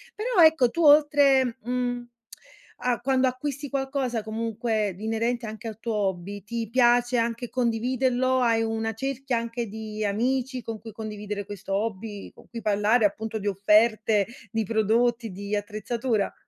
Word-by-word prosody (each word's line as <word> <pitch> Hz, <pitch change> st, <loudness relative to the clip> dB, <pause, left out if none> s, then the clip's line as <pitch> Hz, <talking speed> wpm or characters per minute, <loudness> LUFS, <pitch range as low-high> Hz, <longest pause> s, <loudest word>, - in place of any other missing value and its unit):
Però, 430 Hz, -5 st, +3 dB
ecco, 315 Hz, -7 st, +5 dB
tu 335 Hz, +5 st, -1 dB
oltre, 285 Hz, -4 st, +5 dB
mhmm, 245 Hz, 0 st, -2 dB, 0.7 s
a 250 Hz, -1 st, 0 dB
quando 260 Hz, +1 st, +2 dB
acquisti 280 Hz, +2 st, -4 dB
qualcosa, 270 Hz, -4 st, -1 dB
comunque, 220 Hz, -1 st, -2 dB
di 215 Hz, -, -7 dB
inerente 230 Hz, +2 st, -1 dB
anche 220 Hz, +2 st, -7 dB
al 220 Hz, 0 st, -10 dB
tuo 230 Hz, -1 st, -3 dB
hobby, 195 Hz, 0 st, -2 dB
ti 230 Hz, 0 st, -4 dB
piace 245 Hz, 0 st, +3 dB
anche 235 Hz, +1 st, -1 dB
condividerlo? 255 Hz, +2 st, +1 dB
Hai 230 Hz, -2 st, +3 dB
una 225 Hz, 0 st, -2 dB
cerchia 265 Hz, +1 st, -2 dB
anche 230 Hz, 0 st, -3 dB
di 215 Hz, 0 st, -6 dB
amici, 250 Hz, +5 st, -1 dB
con 225 Hz, -1 st, -6 dB
cui 225 Hz, -, -10 dB
condividere 210 Hz, -2 st, -6 dB
questo 195 Hz, -1 st, -6 dB
hobby, 205 Hz, 0 st, -3 dB
con -, -, -18 dB
cui 230 Hz, -1 st, -7 dB
parlare 210 Hz, +2 st, +3 dB
appunto 220 Hz, +2 st, -2 dB
di 205 Hz, -, -4 dB
offerte, 210 Hz, +1 st, +3 dB, 0.2 s
di 225 Hz, -1 st, 0 dB
prodotti, 230 Hz, +1 st, +1 dB
di 200 Hz, +2 st, -4 dB
attrezzatura? 215 Hz, +1 st, -2 dB
230 Hz, 150 wpm, -26 LUFS, 215-250 Hz, 0.7 s, ecco